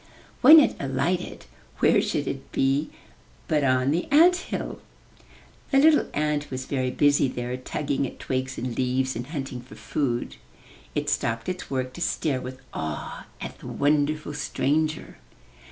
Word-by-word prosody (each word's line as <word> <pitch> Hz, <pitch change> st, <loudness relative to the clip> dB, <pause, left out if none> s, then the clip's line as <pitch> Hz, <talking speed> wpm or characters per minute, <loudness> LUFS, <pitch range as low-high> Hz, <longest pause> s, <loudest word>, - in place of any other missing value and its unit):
When 305 Hz, +5 st, +10 dB
it 295 Hz, -, +3 dB
alighted, 140 Hz, +7 st, -2 dB, 0.3 s
where -, -, +4 dB
should -, -, -2 dB
it -, -, -5 dB
be 135 Hz, +3 st, +1 dB, 0.6 s
but 150 Hz, -2 st, +1 dB
on 130 Hz, 0 st, +2 dB
the 170 Hz, +4 st, 0 dB
ant 335 Hz, +5 st, +7 dB
hill! 360 Hz, -, -5 dB, 0.9 s
The 270 Hz, -, +3 dB
little 300 Hz, +2 st, +5 dB
ant 150 Hz, 0 st, 0 dB
was 130 Hz, 0 st, -5 dB
very 130 Hz, -2 st, -1 dB
busy 145 Hz, +1 st, +3 dB
there, 125 Hz, 0 st, -4 dB
tugging 140 Hz, +2 st, -2 dB
at -, -, -11 dB
twigs 130 Hz, 0 st, -3 dB
and 120 Hz, -1 st, -3 dB
leaves, 130 Hz, +1 st, 0 dB
and 120 Hz, +2 st, -5 dB
hunting 135 Hz, -5 st, -5 dB
for 125 Hz, -, -14 dB
food. 125 Hz, -5 st, -2 dB, 0.6 s
It -, -, -1 dB
stopped 115 Hz, 0 st, -1 dB
its 185 Hz, 0 st, -5 dB
work 130 Hz, -1 st, -2 dB
to 175 Hz, -, -9 dB
stare 140 Hz, -6 st, 0 dB
with 130 Hz, +1 st, -8 dB
awe 80 Hz, -2 st, -5 dB
at -, -, -7 dB
the -, -, -10 dB
wonderful 150 Hz, +1 st, 0 dB
stranger. 150 Hz, +2 st, -1 dB
140 Hz, 155 wpm, -25 LUFS, 130-155 Hz, 0.9 s, When